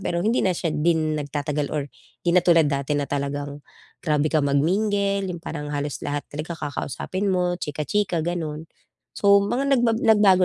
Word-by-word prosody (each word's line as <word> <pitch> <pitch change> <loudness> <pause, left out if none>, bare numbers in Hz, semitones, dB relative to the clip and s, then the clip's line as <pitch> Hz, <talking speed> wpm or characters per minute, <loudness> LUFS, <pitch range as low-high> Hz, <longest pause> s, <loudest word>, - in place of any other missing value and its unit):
pero 175 -1 -1
hindi 230 +3 +2
na 185 - +2
siya 165 - -1
din 155 0 +1
nagtatagal 145 0 -2
or 150 - 0 0.4
'di 175 - +3
na 180 - +7
tulad 165 -3 +4
dati 140 +1 -1
na 145 - 0
talagang 145 0 -3 0.4
grabe 150 -2 +1
ka 155 - +4
mag-mingle, 195 +7 +1
yung 175 -2 -5
parang 150 -3 -5
halos 145 -3 -3
lahat 145 0 -3
talaga 155 +3 -5
kakausapin 150 - -3
mo, 180 -1 +1
chika-chika 160 +3 -1
ganun. 160 -3 -3 0.5
So 200 0 +5
mga 270 +6 +1
nagbag 235 -2 +2
nagbago 205 -4 +5
160 Hz, 165 wpm, -24 LUFS, 145-190 Hz, 0.5 s, na